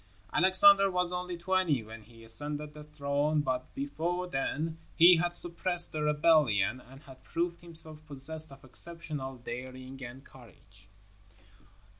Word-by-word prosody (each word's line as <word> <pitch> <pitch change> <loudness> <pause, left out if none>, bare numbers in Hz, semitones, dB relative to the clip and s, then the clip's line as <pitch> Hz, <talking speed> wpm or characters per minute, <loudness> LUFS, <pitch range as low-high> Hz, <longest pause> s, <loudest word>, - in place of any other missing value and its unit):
Alexander 195 +2 +5
was 180 -1 -2
only 180 0 -6
twenty 170 -7 -1
when 110 +1 -13
he 115 +1 -19
ascended 145 +6 +1
the 150 0 -12
throne, 150 0 -2
but 130 -2 -5
before 180 - -4
then 160 +1 -5 0.2
he 175 +1 +6
had 175 +1 -1
suppressed 175 0 +5
a 155 - -4
rebellion 150 -8 +1
and 135 +2 -16
had 130 -1 -17
proved 170 0 -5
himself 160 -2 -5
possessed 155 +2 +1
of 135 - -16
exceptional 150 -2 -2
daring 130 +2 -10
and 130 +3 -11
courage. 95 -6 -20
150 Hz, 135 wpm, -28 LUFS, 130-170 Hz, 0.2 s, he